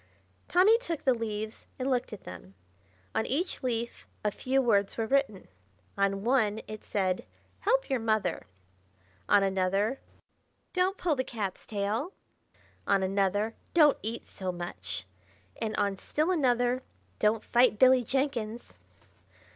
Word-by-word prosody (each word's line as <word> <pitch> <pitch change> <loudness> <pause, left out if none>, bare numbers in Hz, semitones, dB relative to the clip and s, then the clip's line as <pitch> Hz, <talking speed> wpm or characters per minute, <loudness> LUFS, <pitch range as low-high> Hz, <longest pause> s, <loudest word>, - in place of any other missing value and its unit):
Tommy 405 +6 +5
took 340 - -4
the 260 - +5
leaves 220 -2 -5
and 255 - -2
looked 255 -2 0
at 210 - -8
them. 90 +2 -10 0.6
On - - +1
each 345 +8 -1
leaf 235 -2 -3 0.2
a 210 - +3
few 260 +5 0
words 205 -6 +2
were 225 - 0
written. 270 -5 0 0.5
On 195 0 +1
one 225 -4 +2
it 215 0 -8
said, 185 -3 -1 0.4
"Help - - +2
your 265 -3 0
mother!" 215 - 0 0.8
On 200 - +6
another, 195 +5 +1 0.7
"Don't 370 +2 +1
pull 335 -4 +1
the 260 - 0
cat's 205 -7 -5
tail!" 215 - -2 0.7
On 195 -1 +3
another, 200 +3 +1 0.2
"Don't 300 -4 +6
eat 225 +2 -5
so 185 -2 -4
much!" 175 - -5 0.6
And 220 -1 -1
on 200 -2 0
still 310 +5 0
another, 250 -5 +2 0.4
"Don't 215 +1 +2
fight 240 -2 +4
Billy 255 +1 +6
Jenkins!" 240 -3 -2
225 Hz, 135 wpm, -29 LUFS, 200-265 Hz, 0.8 s, On